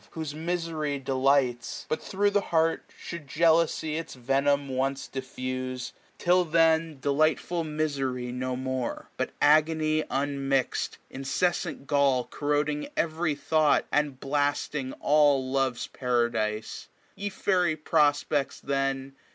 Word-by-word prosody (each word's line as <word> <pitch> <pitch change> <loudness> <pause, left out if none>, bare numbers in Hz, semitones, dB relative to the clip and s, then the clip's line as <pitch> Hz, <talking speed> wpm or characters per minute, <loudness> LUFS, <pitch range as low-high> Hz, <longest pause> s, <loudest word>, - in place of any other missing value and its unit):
Whose 160 -3 -5
misery 160 -2 -2
delights. 135 -2 +1
But 155 - -2
thro* 205 +1 +1
the 205 0 +2
l^eart 165 -3 +1 0.2
Should 170 -4 -8
jealousy 160 0 +2
its 165 - -6
venom 140 +3 +1
once 135 +1 -2
diffuse, 130 -1 -5 0.2
'Tis 180 0 +3
then 160 -2 +3
delightful 155 +4 +1
mis^ 135 -5 -2
no 130 0 -2
more; 130 -1 -4
But - - -2
agony 155 +1 +3
unmixM, 135 -1 -1
incessant 145 +3 -1
gall, 140 -3 +3
2075 - - -15
Corroding 150 - 0
every 160 -1 0
thought, 155 0 +2
and 145 -3 0
blasting 145 -1 -1
all 145 -3 +3
Lovers 135 -2 0
paradise. 120 -4 -1 0.3
Ye 205 +1 -3
fairy 180 -4 +1
prospects, 150 -2 +1
then. 135 -1 -2
145 Hz, 115 wpm, -27 LUFS, 135-160 Hz, 0.3 s, Tis